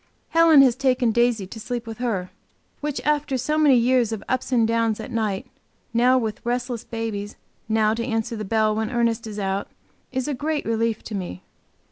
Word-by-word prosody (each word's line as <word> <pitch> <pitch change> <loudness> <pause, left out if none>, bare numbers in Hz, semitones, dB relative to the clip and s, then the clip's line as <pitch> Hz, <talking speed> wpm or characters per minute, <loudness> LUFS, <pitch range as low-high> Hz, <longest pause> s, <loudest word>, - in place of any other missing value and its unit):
Helen 325 -4 +7
has 250 -3 +4
taken 255 -3 +2
Daisy 235 -3 +2
to 220 +4 -9
sleep 240 +1 -4
with 225 0 -8
her, 205 -7 -2 0.5
which 295 -1 -3
after 295 -2 +1
so 260 +5 -1
many 300 -4 +5
years 240 -1 +3
of 220 -3 -4
ups 255 +1 -2
and 235 -3 +3
downs 230 -1 +1
at 220 - -7
night, 215 -4 -1 0.5
now 250 +2 +4
with 220 -2 -3
restless 245 -1 -2
babies, 220 -3 -4 0.3
now 220 -1 +3
to 230 +1 -2
answer 225 -1 -2
the 215 - -4
bell 215 +1 +2
when 220 0 -1
Ernest 235 -2 0
is 210 -1 -7
out, 195 -1 -2 0.4
is 260 0 -2
a 295 - -1
great 295 +3 -2
relief 225 0 0
to 220 - -8
me. 180 - -5
230 Hz, 190 wpm, -23 LUFS, 220-255 Hz, 0.5 s, Helen